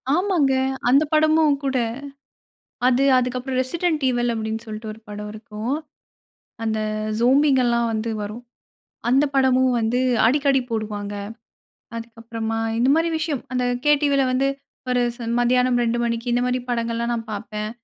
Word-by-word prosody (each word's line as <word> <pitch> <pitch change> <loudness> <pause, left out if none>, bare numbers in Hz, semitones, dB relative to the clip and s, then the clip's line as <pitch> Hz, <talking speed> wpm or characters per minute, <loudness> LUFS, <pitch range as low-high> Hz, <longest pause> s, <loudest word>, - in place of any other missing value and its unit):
ஆமாங்க. 345 -7 +2 0.4
அந்த 280 +4 +5
படமும் 310 -1 +4
கூட. 270 -1 0 1.1
அது 255 +2 +3
அதுக்கப்புறம் 255 +1 -1
"ரெசிடென்ட் 310 +2 -1
ஈவல்" 240 -1 0
அப்படின்னு 220 0 -3
சொல்லிட்டு 215 0 -7
ஒரு 220 - -14
படம் 210 0 -6
இருக்கும். 215 +4 -4 0.9
அந்த 220 -1 -1 0.4
ஜோம்பிங்கலாம் 250 -2 +3
வந்து 220 +1 -2
வரும். 210 +4 -6 0.7
அந்த 270 +4 +4
படமும் 260 -1 +3
வந்து 230 +2 0 0.3
அடிக்கடி 275 +2 +3
போடுவாங்க. 210 -2 -3 0.8
அதுக்கப்புறமா, 230 -1 -5 0.2
இந்த 245 +3 +3
மாரி 330 +1 +2
விஷயம், 310 -5 -2
அந்த 250 0 0 0.2
KTvல 285 -2 +3
வந்து 265 +2 +2 0.4
ஒரு 250 0 +2 0.2
ச - - -30 0.2
மத்தியானம் 250 0 +3
2:00 235 0 0
மணிக்கு 235 +1 -1
இந்த 245 - +2
மாதிரி 250 0 0
படங்கள்லாம் 235 0 -1
நான் 225 -1 -4
பார்ப்பேன். 210 +1 -5
245 Hz, 130 wpm, -22 LUFS, 225-270 Hz, 1.1 s, அந்த